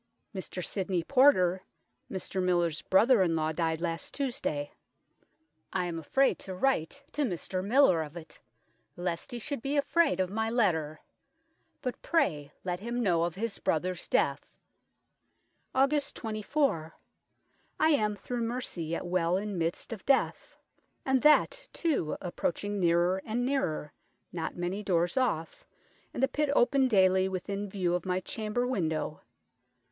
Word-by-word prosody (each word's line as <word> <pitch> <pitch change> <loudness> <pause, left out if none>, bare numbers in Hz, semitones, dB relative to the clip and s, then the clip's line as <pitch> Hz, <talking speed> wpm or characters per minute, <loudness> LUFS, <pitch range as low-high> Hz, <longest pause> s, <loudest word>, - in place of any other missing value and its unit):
Mr 185 -2 -5
Symond 185 -4 -2
Porter, 220 -10 +5 0.5
Mr 190 0 -3
Millers 175 -4 +1
brother 225 +6 +4
in 170 -3 +2
law, 155 0 0
dyed 160 0 -1
last 165 -1 -4
Tuesday: 235 - -2 1.0
I 185 -1 0
am 170 -2 -3
afrayd 270 - +2
to 190 -1 -6
write 270 - 0
to 295 - -2
Mr 185 - -2
Miller 205 - +4
of 155 +2 -7
it, 160 -2 -11 0.6
lest 175 -1 -4
he 240 - -3
should 280 +2 -4
bee 280 +3 -1
afrayd 325 - +2
of 185 0 0
my 220 +1 -1
letter; 160 -10 0 0.8
but 250 - -4
pray 150 - 0
let 180 -1 -2
him 235 +3 -2
know 175 -5 +2
of 170 -1 -4
his 220 +1 -4
brother's 175 +2 -1
death." 140 0 0 1.2
"Aug. 275 +2 +2
24. 215 - -1 0.8
I 315 - +4
am, 215 -9 +2
through 240 +4 -4
mercy, 230 -7 -3
yet 165 +3 -3
well 175 0 +1
in 205 0 -3
middest 170 +7 -2
of 215 - -9
death, 275 -1 +1 0.5
and 265 -1 +2
that, 400 +12 +4
too, 300 - 0
approaching 200 +3 -2
neerer 175 +2 +2
and 240 +3 -1
neerer: 215 - -1 0.4
not 165 -2 -3
many 180 +3 -3
doores 175 -3 +1
off, 230 -12 -1 0.5
and 255 - -3
the - - +6
pitt 300 +1 -1
open 265 +2 +4
dayly 190 -4 +4
within 200 +2 -4
view 185 -3 -1
of 180 0 -2
my 180 0 +1
chamber 215 +5 -2
window. 160 -11 -2
190 Hz, 145 wpm, -30 LUFS, 170-245 Hz, 1.2 s, the